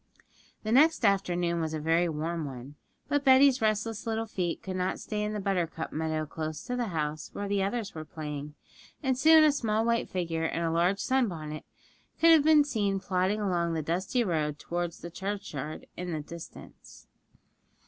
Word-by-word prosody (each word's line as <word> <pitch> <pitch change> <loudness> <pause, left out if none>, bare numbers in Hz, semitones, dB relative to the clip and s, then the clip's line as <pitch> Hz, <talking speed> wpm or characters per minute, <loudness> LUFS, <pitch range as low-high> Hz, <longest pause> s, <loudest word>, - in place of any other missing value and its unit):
The 215 - -2
next 300 +1 +5
afternoon 175 -4 +1
was 160 -1 -2
a - - -3
very 165 +3 +2
warm 160 +2 -3
one; 130 0 -8 0.3
but 290 0 +1
Betty's 265 0 +6
restless 215 +1 -1
little 225 0 -1
feet 180 -6 -3
could 190 -1 -4
not 185 0 -1
stay 210 -1 -3
in 210 0 -1
the 210 - -2
buttercup 180 -5 -2
meadow 155 0 -1
close 155 +1 -5
to 250 - -3
the 245 -2 -1
house, 155 -4 -3
where 205 - -4
the 200 0 0
others 205 +2 -2
were 155 - -6
playing, 150 -1 -6 0.5
and 265 -2 +2
soon 315 +4 +7
a 305 - +6
small 225 -5 0
white 235 0 +1
figure 165 -3 -2
in 170 - -2
a 165 - 0
large 175 +4 +2
sun 260 +1 +2
bonnet 155 -4 -6 0.5
could 330 0 +7
have 320 -3 +7
been 310 -1 +6
seen 205 -8 -1
plodding 190 +3 0
along 175 -4 0
the 160 - -2
dusty 185 - 0
road 155 -6 -1
towards 175 +1 -4
the 170 - -7
churchyard 180 -6 -5
in 180 0 -5
the 155 - -2
distance. 165 +2 -12
185 Hz, 185 wpm, -29 LUFS, 160-225 Hz, 0.5 s, soon